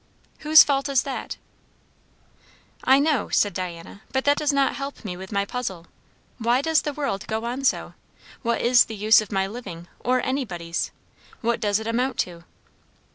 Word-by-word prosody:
"Whose 310 Hz, 0 st, +8 dB
fault 280 Hz, 0 st, 0 dB
is 270 Hz, -2 st, +2 dB
that?" 275 Hz, -, -5 dB, 1.5 s
"I 265 Hz, +1 st, +6 dB
know," 285 Hz, -4 st, +1 dB
said 205 Hz, -, +2 dB
Diana, 180 Hz, +1 st, -6 dB
"but 265 Hz, 0 st, -1 dB
that 285 Hz, 0 st, +5 dB
does 300 Hz, -1 st, +1 dB
not 275 Hz, -1 st, +2 dB
help 275 Hz, -3 st, -7 dB
me 180 Hz, -3 st, -4 dB
with 190 Hz, +2 st, -9 dB
my 200 Hz, -1 st, 0 dB
puzzle. 200 Hz, -8 st, -5 dB, 0.5 s
Why 240 Hz, +2 st, +2 dB
does 320 Hz, -1 st, +3 dB
the 295 Hz, -, -3 dB
world 275 Hz, -9 st, -3 dB
go 220 Hz, +1 st, -2 dB
on 250 Hz, +3 st, -3 dB
so? 270 Hz, -, 0 dB, 0.5 s
what 235 Hz, -2 st, 0 dB
is 240 Hz, 0 st, +5 dB
the 225 Hz, -, -7 dB
use 215 Hz, +2 st, +5 dB
of 215 Hz, -, -9 dB
my 195 Hz, -1 st, +1 dB
living, 195 Hz, -6 st, -8 dB
or 255 Hz, +1 st, +1 dB
anybody's? 175 Hz, -11 st, -2 dB, 0.5 s
What 235 Hz, 0 st, 0 dB
does 205 Hz, -1 st, +1 dB
it 220 Hz, -, -7 dB
amount 245 Hz, +4 st, -1 dB
to?" 170 Hz, -1 st, -8 dB
235 Hz, 175 wpm, -24 LUFS, 200-270 Hz, 1.5 s, Whose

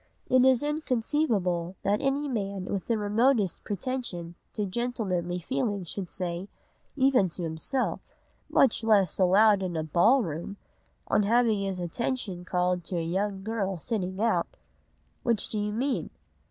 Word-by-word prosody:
It 255 Hz, 0 st, +6 dB
is 260 Hz, 0 st, +4 dB
inconceivable 230 Hz, -, 0 dB
that 205 Hz, +1 st, +1 dB
any 280 Hz, +2 st, 0 dB
man 200 Hz, -6 st, -3 dB
with 195 Hz, -1 st, -3 dB
the 230 Hz, -, +1 dB
remotest 210 Hz, 0 st, +1 dB
pretension 200 Hz, -6 st, -3 dB, 0.2 s
to 210 Hz, -, -1 dB
gentlemanly 190 Hz, -5 st, -2 dB
feeling 205 Hz, +1 st, -2 dB
should 180 Hz, +1 st, -5 dB
say, 180 Hz, 0 st, -4 dB, 0.5 s
even 260 Hz, -8 st, +3 dB
to 175 Hz, +1 st, -4 dB
himself, 165 Hz, +11 st, -2 dB, 0.4 s
much 240 Hz, -3 st, +3 dB
less 205 Hz, -6 st, +3 dB
aloud 200 Hz, +2 st, +5 dB
in 180 Hz, -3 st, -2 dB
a 160 Hz, -, -1 dB
ball 210 Hz, -, +4 dB
room, 170 Hz, +4 st, -5 dB, 0.5 s
on -, -, +3 dB
having 220 Hz, 0 st, +3 dB
his 195 Hz, -2 st, -2 dB
attention 185 Hz, 0 st, -3 dB
called 180 Hz, -1 st, 0 dB
to 180 Hz, -, -2 dB
a 165 Hz, -, -1 dB
young 190 Hz, +3 st, -2 dB
girl 200 Hz, -3 st, -2 dB
sitting 190 Hz, 0 st, -3 dB
out: 225 Hz, +1 st, +2 dB, 0.7 s
"'Which 230 Hz, -4 st, +1 dB
do 215 Hz, -, -1 dB
you 210 Hz, 0 st, -1 dB
mean? 255 Hz, +5 st, -1 dB
205 Hz, 145 wpm, -28 LUFS, 180-235 Hz, 0.7 s, It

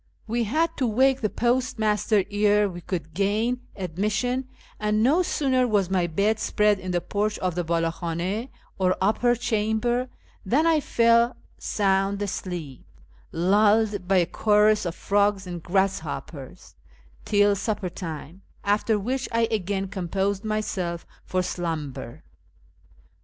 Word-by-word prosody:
We 230 Hz, +1 st, -1 dB
had 315 Hz, +10 st, 0 dB
to 255 Hz, -, +1 dB
wake 260 Hz, +4 st, +3 dB
the 215 Hz, -, +1 dB
postmaster 220 Hz, -3 st, +1 dB
ere 205 Hz, 0 st, +3 dB
we 175 Hz, -2 st, -7 dB
could 165 Hz, -3 st, -5 dB
gain 215 Hz, +7 st, 0 dB
admission, 210 Hz, +8 st, -1 dB, 0.3 s
and 215 Hz, 0 st, +1 dB
no 300 Hz, +9 st, +4 dB
sooner 260 Hz, -7 st, +1 dB
was 200 Hz, -5 st, +1 dB
my 180 Hz, -2 st, +2 dB
bed 205 Hz, +6 st, +1 dB
spread 210 Hz, -1 st, +2 dB
in 185 Hz, -, -6 dB
the 175 Hz, -1 st, +1 dB
porch 210 Hz, +4 st, -2 dB
of 185 Hz, -1 st, -1 dB
the 175 Hz, +1 st, -2 dB
''>Ald 165 Hz, 0 st, 0 dB
hhan6, 180 Hz, +8 st, -3 dB, 0.3 s
or 185 Hz, -1 st, +2 dB
upper 225 Hz, +5 st, +2 dB
chamber, 240 Hz, +1 st, 0 dB, 0.3 s
than 265 Hz, +11 st, +2 dB
I 325 Hz, -2 st, +4 dB
fell 235 Hz, -2 st, +3 dB, 0.2 s
sound 195 Hz, -1 st, +1 dB
asleep, 175 Hz, -8 st, -5 dB, 0.5 s
lulled 205 Hz, +2 st, +2 dB
by 190 Hz, 0 st, +3 dB
a 175 Hz, -, +4 dB
chorus 210 Hz, +2 st, +3 dB
of 170 Hz, -, -4 dB
frogs 200 Hz, -1 st, +1 dB
and 175 Hz, -2 st, -6 dB
grasshoppers, 175 Hz, -4 st, -3 dB, 0.5 s
till 205 Hz, -1 st, +3 dB
supper 205 Hz, -2 st, -2 dB
time, 165 Hz, +1 st, -7 dB, 0.2 s
after 210 Hz, +2 st, +1 dB
which 250 Hz, +6 st, -2 dB
I 230 Hz, 0 st, +2 dB
again 195 Hz, -2 st, -1 dB
com 185 Hz, -2 st, -5 dB
posed 195 Hz, +2 st, -1 dB
myself 190 Hz, -5 st, -2 dB, 0.2 s
for 185 Hz, 0 st, 0 dB
slumber. 155 Hz, -7 st, -5 dB
205 Hz, 135 wpm, -25 LUFS, 180-225 Hz, 0.5 s, no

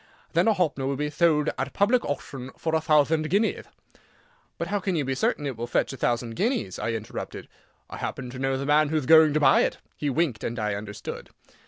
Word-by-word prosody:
Then -, -, +3 dB
a 220 Hz, -, +5 dB
Hoppner 155 Hz, -8 st, 0 dB
will 140 Hz, -, -1 dB
be 150 Hz, +2 st, -2 dB
thold 150 Hz, -1 st, +2 dB
at 135 Hz, 0 st, -3 dB
public 230 Hz, +5 st, +3 dB
auchtion 135 Hz, -2 st, -5 dB
for 160 Hz, -, -2 dB
a 160 Hz, -, +2 dB
thouthand 155 Hz, +1 st, +2 dB
guineath." 210 Hz, +4 st, 0 dB, 0.9 s
"But -, -, -4 dB
how 205 Hz, -, 0 dB
can 190 Hz, -1 st, -1 dB
you 150 Hz, -4 st, 0 dB
be 135 Hz, -, -1 dB
certain 140 Hz, +2 st, 0 dB
it 135 Hz, -3 st, -3 dB
will 120 Hz, +1 st, -5 dB
fetch 120 Hz, -, 0 dB
a -, -, -5 dB
thousand 120 Hz, -1 st, -1 dB
guineas?" 225 Hz, -, -1 dB
I 115 Hz, -, -1 dB
interrupted. 110 Hz, -2 st, -6 dB, 0.4 s
"I -, -, -8 dB
happen 125 Hz, -2 st, -5 dB
to 130 Hz, -, -8 dB
know 135 Hz, 0 st, 0 dB
the 135 Hz, -, -4 dB
man 150 Hz, +1 st, +3 dB
whoth 155 Hz, -3 st, 0 dB
going 160 Hz, +1 st, +7 dB
to -, -, +4 dB
buy 150 Hz, -, +5 dB
it." -, -, 0 dB, 0.2 s
He 145 Hz, -, -2 dB
winked, 140 Hz, -5 st, 0 dB
and 120 Hz, -, -3 dB
I 105 Hz, -2 st, -1 dB
understood. 105 Hz, 0 st, -7 dB
145 Hz, 220 wpm, -26 LUFS, 125-160 Hz, 0.9 s, going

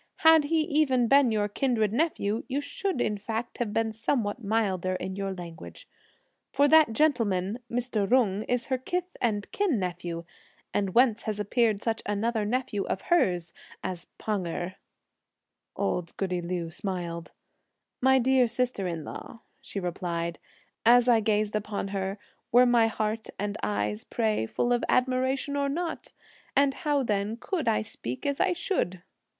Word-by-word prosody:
Had 320 Hz, -2 st, +8 dB
he 320 Hz, +2 st, +2 dB
even 290 Hz, -6 st, +2 dB
been 275 Hz, -1 st, +5 dB
your 210 Hz, -1 st, +1 dB
kindred 220 Hz, -2 st, 0 dB
nephew, 235 Hz, -7 st, 0 dB
you 275 Hz, +1 st, -1 dB
should 370 Hz, +3 st, -2 dB
in 210 Hz, -3 st, 0 dB
fact 225 Hz, +3 st, -4 dB
have 235 Hz, -4 st, -1 dB
been 225 Hz, 0 st, 0 dB
somewhat 225 Hz, 0 st, -1 dB
milder 195 Hz, -4 st, 0 dB
in 190 Hz, +1 st, -4 dB
your 195 Hz, 0 st, -2 dB
language; 165 Hz, -, -9 dB, 0.6 s
for 285 Hz, +2 st, +4 dB
that 310 Hz, -3 st, +6 dB
gentleman, 220 Hz, -7 st, +1 dB
Mr. 235 Hz, -4 st, -1 dB
Jung, 220 Hz, -6 st, +3 dB
is 245 Hz, 0 st, +1 dB
her 260 Hz, -1 st, -1 dB
kith 360 Hz, +7 st, -3 dB
and 210 Hz, -4 st, 0 dB
kin 390 Hz, -, +1 dB
nephew, 175 Hz, -2 st, -4 dB, 0.5 s
and 195 Hz, -2 st, -1 dB
whence 240 Hz, -2 st, +4 dB
has 210 Hz, -1 st, -3 dB
appeared 215 Hz, 0 st, +1 dB
such 225 Hz, -1 st, -1 dB
another 215 Hz, +1 st, 0 dB
nephew 240 Hz, -2 st, -1 dB
of 190 Hz, -, -2 dB
hers 175 Hz, -, +2 dB, 0.3 s
(as 180 Hz, -2 st, -4 dB
Pan 205 Hz, -5 st, -2 dB
Erh)?" 175 Hz, +2 st, -4 dB, 1.0 s
Old 165 Hz, -, -2 dB
goody 185 Hz, -2 st, -1 dB
Liu 170 Hz, -1 st, -3 dB
smiled. 170 Hz, -2 st, -4 dB, 0.7 s
"My 265 Hz, +1 st, +5 dB
dear 260 Hz, 0 st, +4 dB
sister 240 Hz, -4 st, -1 dB
in 165 Hz, -3 st, -4 dB
law," 230 Hz, -, -9 dB, 0.2 s
she 255 Hz, -6 st, -5 dB
replied, 170 Hz, -2 st, -3 dB, 0.4 s
"as 240 Hz, +1 st, +6 dB
I 235 Hz, -2 st, +6 dB
gazed 215 Hz, -1 st, +1 dB
upon 210 Hz, -1 st, -2 dB
her, 195 Hz, 0 st, -2 dB, 0.3 s
were 245 Hz, +2 st, +7 dB
my 240 Hz, -2 st, +4 dB
heart 220 Hz, 0 st, -2 dB
and 205 Hz, 0 st, -2 dB
eyes, 105 Hz, +1 st, -1 dB
pray, 215 Hz, -, 0 dB
full 240 Hz, -, 0 dB
of 240 Hz, -, 0 dB
admiration 260 Hz, +2 st, +1 dB
or 280 Hz, -1 st, +1 dB
not? 330 Hz, +3 st, -3 dB, 0.4 s
and 280 Hz, 0 st, +4 dB
how 290 Hz, -2 st, 0 dB
then 210 Hz, 0 st, -1 dB
could 335 Hz, +4 st, -3 dB
I 105 Hz, -, +2 dB
speak 120 Hz, +3 st, -6 dB
as 280 Hz, -1 st, 0 dB
I 370 Hz, -, +3 dB
should?" 185 Hz, -, -2 dB
220 Hz, 155 wpm, -28 LUFS, 190-255 Hz, 1.0 s, Had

